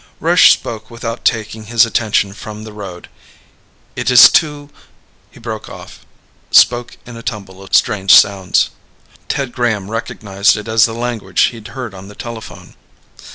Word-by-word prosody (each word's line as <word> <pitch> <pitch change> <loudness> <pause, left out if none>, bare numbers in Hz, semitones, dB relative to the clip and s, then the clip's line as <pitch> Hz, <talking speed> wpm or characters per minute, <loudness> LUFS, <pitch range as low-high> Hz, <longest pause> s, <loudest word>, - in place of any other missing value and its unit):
Rush - - +5
spoke 110 -1 -3
without 115 0 -6
taking 110 -1 -2
his 115 +2 +3
attention 105 -3 0
from 105 +1 -9
the 110 -1 -10
road. 95 -4 -9 0.9
"It - - -2
is 125 0 +8
too 150 -3 0 0.3
..." - - -37
He - - -18
broke 110 -2 -7
off, - - -12 0.5
spoke 120 0 +3
in 120 - -11
a - - -9
tumble 100 -5 -7
of 95 -2 -2
strange 95 -2 +1
sounds. 100 -2 +4 0.6
Ted 135 -3 -2
Graham 110 -5 -2
recognized 100 -3 0
it 105 - -7
as 110 0 +4
the 115 - -4
language 115 -5 -2
he'd 115 -2 -11
heard 120 -5 -6
on 95 0 -11
the 105 - -13
telephone. 105 -7 -10
110 Hz, 155 wpm, -16 LUFS, 100-120 Hz, 0.9 s, is